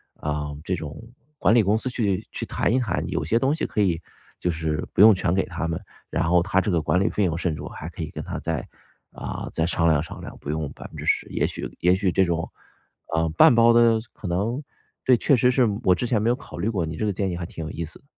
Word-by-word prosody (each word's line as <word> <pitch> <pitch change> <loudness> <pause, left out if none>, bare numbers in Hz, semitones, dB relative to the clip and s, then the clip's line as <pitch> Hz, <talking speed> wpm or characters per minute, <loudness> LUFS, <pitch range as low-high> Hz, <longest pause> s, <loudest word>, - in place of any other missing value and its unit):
啊， 75 0 -3 0.2
这 95 +2 -1
种 80 -3 -7 0.4
管 105 - +3
理 120 - +6
公 105 +2 +2
司 130 - -3
去 105 -4 -1
去 - - -5
谈 115 - 0
一 130 - +3
谈， 120 -4 -1
有 - - -1
些 115 - +1
东 135 +4 +2
西 - - -2
可 - - -3
以 90 -5 +2 0.4
就 90 - -1
是 80 -2 -2
不 - - -6
用 110 +1 +10
全 90 -3 0
给 95 - +1
他 85 - -4
们。 80 -1 -2 0.3
然 85 - 0
后 85 +1 +4
它 95 +1 +1
这 100 +1 0
个 85 -2 +2
管 90 +4 +1
理 100 - +2
费 105 - +1
用 85 -2 -1
甚 85 -3 -1
至 75 - -8
我 75 - -6
还 80 - -8
可 85 - -9
以 80 - -5
跟 - - -7
他 - - -5
再， - - -3 0.4
啊， - - -6
再 80 - +1
商 85 -1 +1
量 75 -3 +4
商 80 - -8
量， - - -8
不 70 - -7
用 75 -1 -2
10%。 - - -2
也 - - 0
许 - - -4
也 90 +1 +4
许 95 -2 +1
这 95 - +3
种， 85 -1 -2 0.7
呃， 80 0 +2
半 80 +9 +6
包 115 0 +6
的 115 -1 +5
可 105 - -8
能？ 105 +11 -1 0.4
对， 130 - +6
确 130 +3 +3
实 125 +2 +4
是 125 -1 +3 0.2
我 90 -2 +5
之 125 - -2
前 115 -3 +1
没 115 - +2
有 120 - +3
考 140 - -11
虑 110 - 0
过， 95 -7 -1
你 80 0 -6
这 110 - -1
个 105 - 0
建 95 +1 -1
议 85 - -4
还 85 - -4
挺 80 - -7
有 80 - -5
意 85 - -4
思。 80 - -14
90 Hz, 285 characters per minute, -24 LUFS, 80-110 Hz, 0.7 s, 用